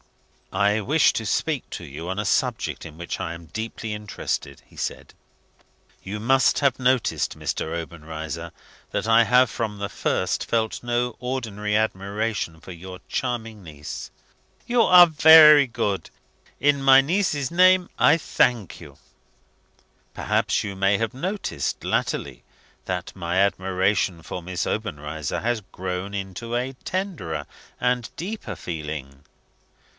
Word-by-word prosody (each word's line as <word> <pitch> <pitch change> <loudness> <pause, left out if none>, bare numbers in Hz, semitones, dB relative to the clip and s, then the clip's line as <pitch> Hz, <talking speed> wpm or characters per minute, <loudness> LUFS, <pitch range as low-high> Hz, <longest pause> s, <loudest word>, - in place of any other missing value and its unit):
"I 105 +2 +2
wish 140 +6 +3
to 110 - -3
speak 145 +4 -1
to 85 - -7
you 80 +4 -7
on 95 - -3
a 105 - -2
subject 100 - -1
in 75 - -10
which 85 0 -5
I 80 +1 -4
am 85 0 -12
deeply 110 +3 -5
interested," 105 -9 -4
he - - -22
said. - - -5 0.9
"You 105 +2 -5
must 130 +4 +3
have 140 -3 +2
observed, 130 -1 +1
Mr. 80 - -3
Obenreizer, 80 -2 -7 0.4
that - - -2
I 115 +1 +6
have, 125 +3 +5
from 105 -1 -3
the 100 0 -3
first, 95 - -1
felt 110 0 -1
no 120 0 -1
ordinary 110 -5 -3
admiration 100 -4 -2
for 85 - -11
your 90 +1 -9
charming 115 -5 -3
niece?" 75 -3 -8 0.6
"You 240 0 +2
are 180 -4 +9
very 155 -2 +8
good. 100 -6 -2 0.5
In 145 0 +2
my 135 0 +7
niece's 150 -2 0
name, 185 +1 +5
I 150 - +5
thank 120 - 0
you." - - -13 1.2
"Perhaps - - 0
you 100 -2 -5
may 100 +1 +2
have 115 0 -2
noticed, 170 - -3
latterly, 60 0 -2 0.4
that - - -4
my 85 -1 -2
admiration 95 -2 +1
for 90 - -6
Miss 90 0 -3
Obenreizer 80 - -3
has 115 -1 0
grown 95 +2 -4
into 100 +5 -5
a 125 +2 -2
tenderer 175 - -3 0.3
and 125 -1 0
deeper 205 +6 -5
feeling 75 -4 -6
105 Hz, 135 wpm, -24 LUFS, 90-130 Hz, 1.2 s, are